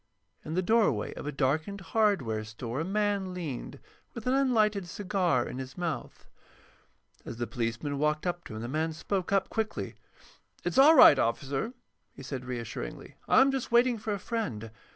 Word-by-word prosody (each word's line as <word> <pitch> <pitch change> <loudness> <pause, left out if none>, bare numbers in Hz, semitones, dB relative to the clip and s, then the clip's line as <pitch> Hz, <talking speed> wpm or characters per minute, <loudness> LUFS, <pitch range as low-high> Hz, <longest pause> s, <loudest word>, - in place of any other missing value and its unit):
In 155 - -5
the 185 - +1
doorway 210 - +2
of - - -7
a - - -1
darkened 155 +8 -1
hardware 190 - +1
store 115 +4 -5
a - - 0
man 200 -1 -1
leaned, 155 -9 -5 0.4
with 235 - -7
an 250 - +2
unlighted 215 -8 +2
cigar 180 -8 0
in 130 - -6
his 130 +4 -8
mouth. 170 -3 -4 1.0
As 115 - -7
the 120 - -2
policeman 120 +5 -3
walked 150 +2 0
up 175 -1 -2
to 110 - -8
him 110 - -5
the - - -4
man 160 +4 -1
spoke 185 +3 -3
up 195 -1 +2
quickly. 220 -1 -2 0.7
"It's - - +1
all 305 +4 +8
right, 145 - +9
officer," 135 - -1 0.4
he - - -10
said, 130 -1 -5
reassuringly. 120 - -6
"I'm 270 +1 +5
just 265 -3 -3
waiting 240 0 +4
for 215 +1 -4
a 205 - 0
friend. 135 - -4
170 Hz, 175 wpm, -29 LUFS, 130-210 Hz, 1.0 s, right